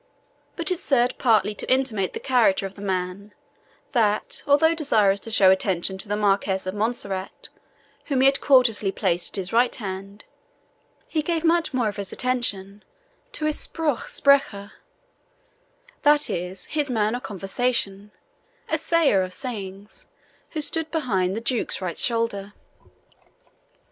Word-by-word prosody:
But 335 0 0
it 360 - -1
served 250 -3 +1
partly 220 -4 +3
to 210 - -4
intimate 245 -8 +1
the - - -5
character 235 -7 +2
of 195 - -6
the 200 - -13
man, 190 +1 -4 0.6
that, 215 -4 +1
although 320 +3 +4
desirous 215 -11 +2
to 225 - -6
show 195 -4 +5
attention 190 0 0
to 200 - -5
the 205 - -1
Marquis 195 -2 +1
of 185 - -2
Montserrat, 205 -3 -3 0.6
whom 270 -3 0
he - - +4
had 275 0 +3
courteously 235 -8 +3
placed 175 -3 -1
at - - -8
his 195 0 -3
right 240 +2 +3
hand, 195 -1 -7 0.8
he 315 - -1
gave 330 +1 -1
much 335 0 +2
more 250 -4 0
of 210 - -4
his 200 -2 -5
attention 210 -6 -2 0.5
to 305 - -4
his 305 -1 +1
SPRUCH 305 -7 -1
SPRECHER 225 -8 +2 1.3
that 295 0 +4
is, 180 +2 -4
his 295 -2 -1
man 220 -3 +1
of 245 - -3
conversation, 200 0 -2 0.6
or - - +2
SAYER 320 - +3
OF 185 0 -3
SAYINGS 205 -4 -7 0.5
who 310 - -2
stood 320 +1 -1
behind 200 - -1
the 225 - -4
Duke's 235 0 -1
right 180 -3 -4
shoulder. 230 -4 -1
215 Hz, 150 wpm, -24 LUFS, 195-265 Hz, 1.3 s, show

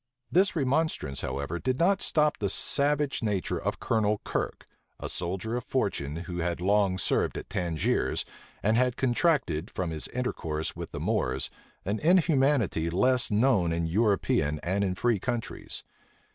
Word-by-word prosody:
This 190 +2 +3
remonstrance, 140 - 0
however, 70 +5 -3
did 130 +5 -1
not 190 +5 +3
stop 150 -1 +2
the 100 - 0
savage 145 +5 +2
nature 105 -5 -1
of - - -3
Colonel 105 -2 +1
Kirke, - - -3 0.3
a - - -4
soldier 95 +6 -3
of 125 - -2
fortune, 95 - -1
who 90 0 -5
had 85 0 -1
long 100 0 +2
served - - 0
at - - -8
Tangiers, 80 -6 0 0.4
and 110 +2 +3
had 125 0 +2
contracted, 125 - +1
from 90 -3 -3
his 80 -1 -4
intercourse 80 -11 -3
with - - -6
the - - -5
Moors, 65 +2 -1 0.3
an 100 +3 -1
inhumanity 145 - +3
less 125 +8 +2
known 105 -5 +3
in 85 0 0
European 85 -6 +1
and 95 +3 0
in 95 -2 0
free 115 +1 +1
countries. 120 +1 -4
105 Hz, 150 wpm, -28 LUFS, 85-130 Hz, 0.4 s, This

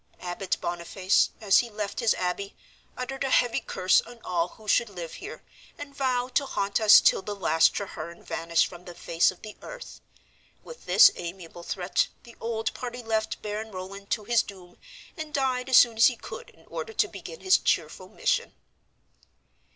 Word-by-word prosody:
Abbot 180 +1 -3
Boniface, 175 +3 +1
as 200 -2 +5
he 240 - -2
left 210 -2 -4
his 230 -3 +2
abbey, 185 +2 -3 0.4
uttered 270 +2 -4
a 270 - -1
heavy 245 -2 +3
curse 185 0 +2
on 240 -1 -13
all 170 -1 0
who 215 +4 -17
should 230 +2 +3
live 175 -4 -7
here, 405 +4 -9 0.3
and 290 -1 -9
vowed 255 -2 -1
to 280 +1 +1
haunt 200 -1 -1
us 215 0 +9
till - - +3
the 205 +1 -5
last 165 -4 +3
Treherne 170 -4 -6
vanished 165 0 +1
from 175 0 -11
the 175 -2 -10
face 170 0 +2
of 185 - -9
the 215 -1 -9
earth. - - -10 0.6
With 485 -1 -12
this - - +8
amiable 175 -1 -8
threat 180 +1 -1 0.2
the 235 - -15
old 225 -1 -2
party 245 0 -6
left 220 -1 -2
Baron 215 +1 -4
Roland 195 +1 -8
to 215 - -1
his 235 +1 +3
doom, 180 -3 -13 0.4
and 315 -2 -6
died 260 -2 0
as 260 - +6
soon 235 -2 +6
as 225 - +7
he 250 - 0
could - - -9
in - - -22
order 470 -3 -6
to - - +2
begin 485 - -10
his 375 0 +4
cheerful - - -1
mission." 480 -1 -1
210 Hz, 180 wpm, -27 LUFS, 180-250 Hz, 0.6 s, us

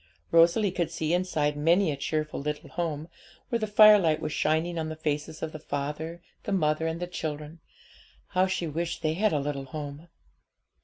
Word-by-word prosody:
Rosalie 170 +5 +5
could 175 -2 -1
see 160 +1 -1
inside 160 -5 +1
many 165 +4 +3
a - - -2
cheerful 155 +2 -2
little 150 +1 -4
home, 160 -2 -3 0.4
where 235 -2 0
the 215 - -1
firelight 205 -7 +6
was 155 - -3
shining 160 +3 0
on 160 -1 -2
the 160 - -5
faces 155 0 -3
of 160 - -3
the 155 - -8
father, 150 +4 -4 0.2
the - - -5
mother, 160 -3 +1
and 165 +1 -3
the 175 - -2
children. 155 -2 -5 0.7
How 185 0 +2
she 190 -2 -1
wished 170 +2 -3
they 155 0 +1
had 210 +5 +2
a 150 - +1
little 140 -1 -3
home! 145 +2 -7
160 Hz, 185 wpm, -28 LUFS, 150-175 Hz, 0.7 s, firelight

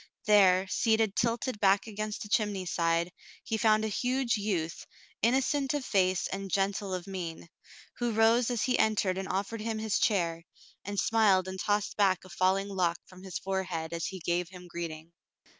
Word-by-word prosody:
There, 195 -3 +5
seated 220 0 +1
tilted 235 0 -1
back 195 0 +3
against 215 -1 -4
the - - -8
chimney 205 -3 0
side, 170 0 0 0.3
he 225 - -2
found 220 0 +3
a - - 0
huge 250 +3 0
youth, 185 -6 -3 0.3
innocent 270 +4 +2
of 285 -3 -3
face 185 -3 +2
and 195 0 -4
gentle 195 +1 0
of 180 -2 -3
mien, 175 -4 -6 0.5
who 240 -1 0
rose 225 +2 +3
as 240 -3 -1
he 255 - +1
entered 200 -4 +2
and 190 - -4
offered 200 +4 -2
him 225 0 -2
his 220 -1 0
chair, 170 -6 +1 0.4
and 205 0 -3
smiled 200 -5 +3
and 190 0 -6
tossed 205 +1 0
back 190 -3 +2
a - - -13
falling 190 +2 +1
lock 180 -3 0
from 185 -1 -15
his 190 -1 -5
forehead 180 -4 -3
as 165 -1 -2
he 190 - -6
gave 175 0 -1
him 180 -1 -12
greeting. 165 -1 -6
195 Hz, 175 wpm, -29 LUFS, 185-220 Hz, 0.5 s, There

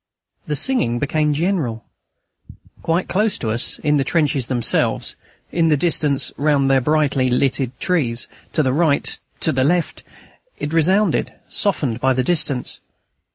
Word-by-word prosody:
The 150 - -1
singing 145 - +1
became 150 +3 0
general. 150 - -1 1.0
Quite 165 +3 0
close 210 +2 +1
to 110 - -2
us, 115 +2 0
in 150 -1 +3
the 135 - +2
trenches 140 -4 +1
themselves, 120 -3 +1 0.4
in 165 -1 +2
the 150 - +3
distance, 150 -3 0
round 140 -2 +2
their 135 -1 +4
brightly 140 -2 +1
lighted 130 0 0
trees, 130 -11 -1 0.3
to 155 - +2
the 130 -2 +1
right, 150 -1 +1 0.2
to - - +3
the 130 0 +1
left, 170 +4 0 0.6
it 150 - -4
resounded, 185 +3 +2
softened 140 - -1
by 130 0 +3
the 130 0 0
distance. 150 -7 -1
145 Hz, 145 wpm, -20 LUFS, 130-165 Hz, 1.0 s, their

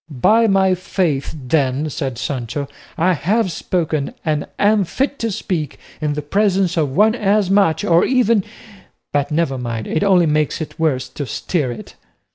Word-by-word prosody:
"By 215 - +3
my 190 -2 +3
faith 170 -6 -1
then," 135 +1 0
said 135 -4 -4
Sancho, 135 +2 -3 0.3
"I 180 +3 +3
have 190 +6 0
spoken, 160 -4 -2
and 150 -2 -1
am 210 0 +3
fit 270 +9 -2
to 230 - -1
speak, 170 -7 -3 0.2
in 150 -1 0
the 150 0 -4
presence 195 +1 +1
of 155 -4 +1
one 215 +4 +4
as 205 -3 +1
much, 195 -3 +3
or 170 -3 +4
even 235 -5 +2 0.7
but 145 -1 0
never 150 -4 0
mind 115 -3 -4
it 155 - -1
only 185 -4 +4
makes 150 -1 0
it 160 +1 -7
worse 150 -6 0
to 145 - -6
stir 130 +2 -2
it." - - -11
165 Hz, 165 wpm, -19 LUFS, 145-195 Hz, 0.7 s, one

